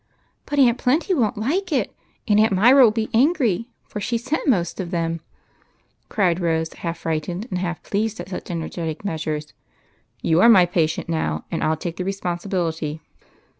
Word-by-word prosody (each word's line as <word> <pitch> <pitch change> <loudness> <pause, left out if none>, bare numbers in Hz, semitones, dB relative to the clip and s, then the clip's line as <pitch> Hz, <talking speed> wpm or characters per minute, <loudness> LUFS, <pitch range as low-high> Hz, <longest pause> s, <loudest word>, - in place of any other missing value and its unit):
" - - -44
But 290 - -3
Aunt 250 -3 +4
Plenty 300 +9 +1
won't 235 - +1
like 335 - -1
it; 255 -9 0 0.3
and 210 0 +4
Aunt 220 0 +4
Myra 245 +8 +6
will - - +6
be 220 0 -2
angry, 240 - +2 0.2
for 210 - -6
she 235 +4 0
sent 260 +8 -3
most 180 -8 +1
of 180 -3 -3
them! 165 -2 -2 0.4
" - - -42
cried 180 -5 +1
Rose, 160 -2 0
half 170 -1 -5
frightened 165 +5 -3
and 180 - -1
half 175 -2 -3
pleased 220 +2 -2
at - - -7
such 185 - -6
energetic 165 0 -4
measures. 155 -4 -3 0.3
" - - -40
You 165 +2 +3
are 230 - +7
my 190 -6 +7
patient 165 -3 0
now, 120 - -2
and 165 - -2
I - - +1
'11 160 0 0
take 170 -2 -4
the 185 - -2
respon 185 -2 -3
sibility. 165 -5 -2
185 Hz, 195 wpm, -22 LUFS, 165-230 Hz, 0.4 s, are